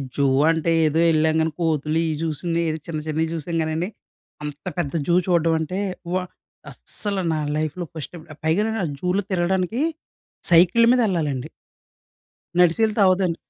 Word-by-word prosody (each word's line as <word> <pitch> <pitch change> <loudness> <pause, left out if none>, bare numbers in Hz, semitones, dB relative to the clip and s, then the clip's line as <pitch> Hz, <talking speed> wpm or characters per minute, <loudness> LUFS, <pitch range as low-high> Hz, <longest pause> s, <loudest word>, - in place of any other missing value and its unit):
Zoo 140 - +2 0.2
అంటే 165 0 +1 0.2
ఏదో 155 +2 +1
ఎల్లంగాని 160 +1 +2
కోతులు, 155 -1 0
ఇవి 155 -1 -2
చూసింది. 165 +2 -2
ఏదో 155 - -2
చిన్న, 160 -2 -3
చిన్నవి 160 +1 0
చూసాం 165 +1 -4
గానండి. 160 +3 -2 0.5
అంత 150 +2 -7
పెద్ద 160 -6 -2
జూ 170 - +3
చూడ్డం 170 -2 +3
అంటే 170 +4 -3 0.3
వ - - +1 0.6
అస్సలు 200 -3 -4
నా 155 - -1 0.2
లైఫ్‌లో 155 +3 -2
ఫస్ట్ 155 -3 -7
టైం, 170 -3 -9 0.2
పైగా 160 +5 +2
నేను 220 -3 -2 0.2
జూలో 180 +4 0
తిరగడానికి 185 +5 0 0.7
సైకిల్ 180 +7 +6
మీద 255 - +4
వెళ్ళాలండి. 155 - -1 1.1
నడిచెల్తే 210 +6 +3
అవ్వదండీ. 185 -2 +2
165 Hz, 140 wpm, -22 LUFS, 155-180 Hz, 1.1 s, సైకిల్